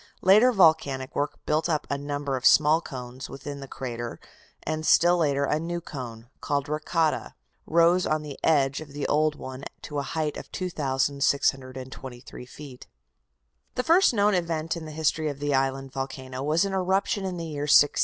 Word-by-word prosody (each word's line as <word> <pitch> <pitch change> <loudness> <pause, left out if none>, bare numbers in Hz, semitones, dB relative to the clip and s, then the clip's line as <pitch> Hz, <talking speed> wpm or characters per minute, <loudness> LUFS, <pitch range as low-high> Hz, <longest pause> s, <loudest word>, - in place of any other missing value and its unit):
Later 215 +7 +6
volcanic 150 - +2
work 145 +1 -1
built 155 +2 +1
up 155 -3 0
a 140 - -1
number 145 -1 -3
of 130 - -5
small 155 +4 +5
cones 130 -3 -8
within 140 +1 -7
the 135 - -8
crater, 120 -3 -6 0.4
and 155 0 -3
still 175 +2 +5
later 140 -3 +1
a 150 +2 +1
new 170 +1 -3
cone, 120 -8 -8
called 140 -1 -1
Rakata, 155 +1 -1 0.3
rose 170 +2 +4
on 155 0 0
the 145 -2 -8
edge 140 -2 +2
of 145 -3 -11
the 145 0 -3
old 155 0 +2
one 130 -1 -8 0.2
to 145 -1 -4
a - - 0
height 150 +1 -3
of - - -9
2,623 135 -5 -2
feet. 135 -1 -11 0.9
The 250 - 0
first 345 +6 +5
known 210 -2 +2
event 165 -3 -1
in 165 -2 -7
the 155 - -8
history 155 0 0
of 145 - -5
the 145 0 -1
island 135 0 0
volcano 130 -1 -5
was 155 +6 +2
an 195 - -3
eruption 190 +2 0
in 185 -2 -3
the 165 - -4
year 145 -2 -4
1680. 145 0 +5
145 Hz, 175 wpm, -26 LUFS, 135-165 Hz, 0.9 s, Later